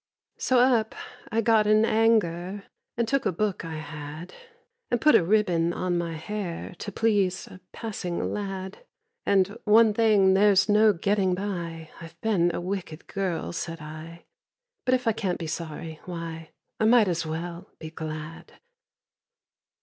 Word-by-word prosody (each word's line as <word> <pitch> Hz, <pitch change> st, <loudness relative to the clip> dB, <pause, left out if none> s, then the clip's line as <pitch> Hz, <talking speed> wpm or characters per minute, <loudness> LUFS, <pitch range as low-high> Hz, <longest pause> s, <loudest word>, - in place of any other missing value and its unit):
So 255 Hz, -, +2 dB
up 240 Hz, -3 st, +3 dB, 0.4 s
I 225 Hz, -, +2 dB
got 220 Hz, -1 st, +3 dB
in 215 Hz, +1 st, +5 dB
anger, 205 Hz, -4 st, +1 dB, 0.3 s
And 235 Hz, -1 st, +1 dB
took 275 Hz, +2 st, +1 dB
a -, -, +1 dB
book 200 Hz, +1 st, -2 dB
I 165 Hz, -1 st, -5 dB
had, 155 Hz, +1 st, -8 dB, 0.6 s
And 240 Hz, -, +1 dB
put 305 Hz, +6 st, +5 dB
a -, -, +6 dB
ribbon 175 Hz, -3 st, +2 dB
on 180 Hz, 0 st, -1 dB
my 170 Hz, -1 st, -2 dB
hair 180 Hz, +1 st, -5 dB
To 205 Hz, -, -5 dB
please 200 Hz, -4 st, +1 dB
a 185 Hz, -, -13 dB
passing 195 Hz, -6 st, -4 dB
lad. 195 Hz, -, -5 dB, 0.4 s
And, 200 Hz, +1 st, +3 dB
"One 220 Hz, 0 st, +5 dB
thing 205 Hz, -4 st, +4 dB
there's 195 Hz, 0 st, +5 dB
no 215 Hz, +1 st, +5 dB
getting 195 Hz, 0 st, +1 dB
by— 170 Hz, -5 st, -5 dB
I've 165 Hz, 0 st, -11 dB
been 195 Hz, -6 st, +2 dB
a -, -, -3 dB
wicked 175 Hz, -3 st, -5 dB
girl," 190 Hz, -5 st, -3 dB
said 165 Hz, -1 st, -4 dB
I; 155 Hz, +2 st, -10 dB, 0.6 s
"But 255 Hz, -, +4 dB
if 255 Hz, 0 st, -3 dB
I -, -, +5 dB
can't 195 Hz, -4 st, -2 dB
be 165 Hz, -, -5 dB
sorry, 160 Hz, 0 st, -6 dB
why, 165 Hz, -2 st, -6 dB, 0.3 s
I 220 Hz, -, +2 dB
might 225 Hz, -2 st, +6 dB
as 170 Hz, -2 st, 0 dB
well 170 Hz, +4 st, -5 dB
be 160 Hz, -1 st, -8 dB
glad!" 155 Hz, 0 st, -7 dB
185 Hz, 155 wpm, -26 LUFS, 165-215 Hz, 0.6 s, a